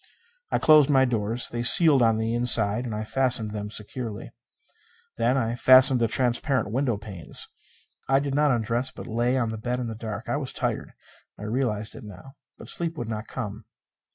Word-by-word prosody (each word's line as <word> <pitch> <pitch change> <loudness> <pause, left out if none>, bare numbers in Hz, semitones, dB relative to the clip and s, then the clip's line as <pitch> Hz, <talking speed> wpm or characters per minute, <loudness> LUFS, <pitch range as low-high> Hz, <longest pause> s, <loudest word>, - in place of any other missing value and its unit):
I - - +1
closed 155 -2 +5
my 135 -2 +4
doors. 115 -1 -1
They 120 - -4
sealed 140 +2 +5
on 115 -2 +3
the 110 +1 -2
inside, 120 -1 +3
and 115 -3 -4
I 105 - -4
fastened 115 -2 +1
them 105 -1 -5
securely. 110 +1 -7 0.9
Then 120 +3 +1
I 115 -3 -1
fastened 130 +1 +6
the 115 - +2
transparent 120 -1 -1
window 125 -2 -1
panes. 100 -5 -7 0.6
I 135 - +4
did 140 0 -2
not 150 +1 +2
undress, 120 +1 -1
but - - -10
lay 120 +3 0
on 115 -3 -1
the 110 - -6
bed 125 +2 -3
in 125 - -3
the 115 - -5
dark. 110 0 -7
I - - -1
was 135 -3 -4
tired; - - -3 0.4
I - - -10
realized 110 -2 -2
it - - -11
now. 105 +5 -12 0.3
But - - -12
sleep 165 -1 -2
would 120 -5 -5
not 110 0 -5
come. 110 -3 -7
120 Hz, 190 wpm, -25 LUFS, 110-130 Hz, 0.9 s, fastened